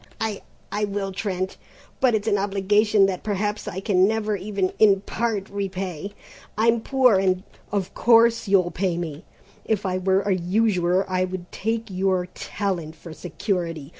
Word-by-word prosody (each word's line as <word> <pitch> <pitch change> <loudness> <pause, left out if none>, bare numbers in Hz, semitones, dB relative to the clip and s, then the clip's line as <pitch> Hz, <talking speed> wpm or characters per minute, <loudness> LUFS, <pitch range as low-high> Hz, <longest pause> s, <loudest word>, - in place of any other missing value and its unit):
"I 220 -3 -2 0.3
I 210 0 0
will, 200 -1 -3
Trent, 190 -1 -3 0.4
but 250 -4 +4
it's 215 0 -2
an 205 -2 +2
obligation 205 +1 +3
that 190 -2 -2
perhaps 210 0 -2
I 190 - -4
can 190 -2 +3
never 215 -1 0
even 195 -1 -2
in 200 -3 +5
part 210 -1 -2
repay, 195 -2 -4 0.4
I'm 230 +1 +3
poor 255 -6 +4
and 185 -1 +1
" - - -30
"Of 195 -3 -2
course 230 -1 +4
you'll 185 -3 +3
pay 180 -2 -1
me! 165 0 -5 0.4
If 210 -2 -1
I 185 0 0
were 190 +1 +2
a 200 0 +1
usurer 185 0 +1
I 185 -1 +1
would 180 -1 -7
take 225 0 -3
your 185 -1 +1
talent 175 -6 -3
for 165 -1 -11
security. 170 -4 -3
195 Hz, 165 wpm, -24 LUFS, 185-210 Hz, 0.4 s, in